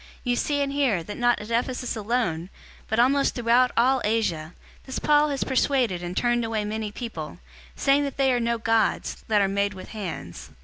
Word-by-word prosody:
019:026 - - -19 0.2
You 245 -1 +1
see 285 +3 0
and 280 -1 0
hear, 255 -12 +1
that 205 - -7
not 240 -1 +2
at 210 +2 -8
Ephesus 250 +2 -1
alone, 205 -7 -1 0.4
but 220 - -1
almost 275 +4 +3
throughout 245 +1 +3
all 255 +2 +4
Asia, 180 -8 -1 0.3
this 260 - -5
Paul 300 0 +3
has 275 -2 -1
persuaded 255 -8 +1
and 175 +1 -5
turned 240 0 +2
away 220 -2 -2
many 215 0 -3
people, 205 - -6 0.4
saying 275 +1 +3
that 280 - -5
they 270 -2 +3
are 245 - +1
no 235 0 0
gods, 225 -1 0
that 210 -2 +3
are - - +2
made 200 +1 0
with 185 - -10
hands. 170 - -7
230 Hz, 195 wpm, -25 LUFS, 205-255 Hz, 0.4 s, all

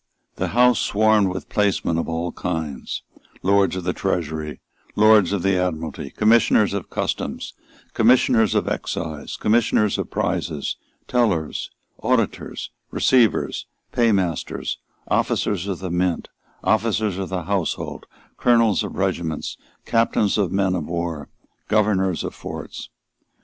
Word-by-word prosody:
The - - -1
House 125 -1 +5
swarmed 110 -1 +3
with 95 0 -4
placemen 100 -5 +1
of - - -3
all 85 +1 -2
kinds, 80 -6 -4 0.4
Lords 95 -1 +3
of 95 - -4
the 90 +1 0
Treasury, 80 -5 -2 0.4
Lords 105 -3 +6
of 100 -4 -1
the 95 -1 +3
Admiralty, 80 -3 -3
Commissioners 110 -2 +4
of 100 -3 -4
Customs, - - -3 0.4
Commissioners 115 -3 +4
of - - +1
Excise, 80 -3 -4
Commissioners 105 -2 +2
of - - -3
Prizes, 75 -4 -2 0.3
Tellers, 105 -11 0 0.3
Auditors, - - -1 0.2
Receivers, 120 -7 +2 0.2
Paymasters, 95 -9 0 0.3
Officers 100 -2 0
of 95 -3 -2
the 95 -1 -5
Mint, 90 -1 0 0.3
Officers 110 -3 +1
of 95 -3 -3
the 90 -2 -3
household, 95 0 -2 0.3
Colonels 115 -4 +3
of - - -6
regiments, 85 -5 -2 0.3
Captains 115 -3 +2
of 95 -4 +1
men 95 -1 +1
of 85 -5 -2
war, 85 -4 -3 0.4
Governors 95 -5 +2
of - - -4
forts. - - -7
95 Hz, 125 wpm, -22 LUFS, 85-110 Hz, 0.4 s, Lords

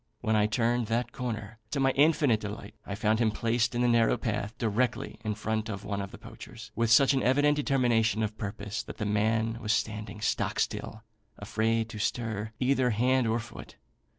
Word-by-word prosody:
When 110 0 +1
I 105 0 +3
turned 115 +2 +1
that 115 +2 -1
corner, 110 -3 -5
to 140 - -2
my 135 0 +3
infinite 145 -5 +3
delight 105 -1 -7
I 100 - -3
found 110 +1 +1
him 115 -2 +3
placed 115 +2 0
in 120 - +1
the - - +3
narrow 115 -1 +3
path, 105 -1 -3
directly 115 0 -1
in 105 -2 -2
front 110 +1 -2
of 100 -1 -5
one 100 -1 -2
of 100 - -5
the - - -11
poachers, 110 -1 -11
with 115 -1 +1
such 135 +4 +6
an 135 - +1
evident 145 +4 +3
determination 120 -6 +2
of 105 0 -2
purpose, 100 +1 -4
that - - -10
the 110 - -3
man 110 +2 +1
was 105 -1 +1
standing 105 -2 -3
stock 105 - -1
still, 110 0 -3 0.3
afraid 110 +2 0
to 110 - -7
stir 110 -1 -2
either 130 -1 +2
hand 125 +2 +2
or 110 +1 +1
foot. 115 - -9
115 Hz, 195 wpm, -29 LUFS, 105-120 Hz, 0.3 s, such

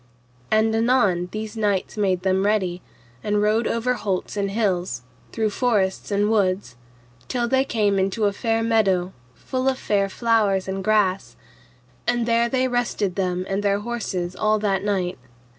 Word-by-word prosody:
And 220 +1 +3
anon 225 -7 +2
these 215 +1 -5
knights 205 -4 -1
made 190 -4 0
them 190 0 +2
ready, 190 -4 0 0.4
and 210 0 +1
rode 215 +2 +2
over 230 +2 0
holts 195 -6 -3
and 200 -1 -1
hills, 190 - -1 0.3
through 220 -2 0
forests 205 -5 0
and 205 +1 +1
woods, 190 - 0 0.5
till 240 -1 -1
they 265 +2 +3
came 210 -6 +1
into 195 +3 0
a 200 - +2
fair 225 +1 0
meadow 195 -5 +2 0.2
full 260 +1 -1
of 260 - -1
fair 200 -4 0
flowers 210 -4 +1
and 190 0 -3
grass; 195 - +1 0.7
and 240 -1 +1
there 235 0 +2
they 260 +1 +1
rested 240 -6 -1
them 185 -1 -1
and 195 +1 -1
their 200 0 +1
horses 195 -6 -3
all 215 0 +2
that 195 -2 0
night. 190 -5 -1
205 Hz, 160 wpm, -23 LUFS, 190-225 Hz, 0.7 s, And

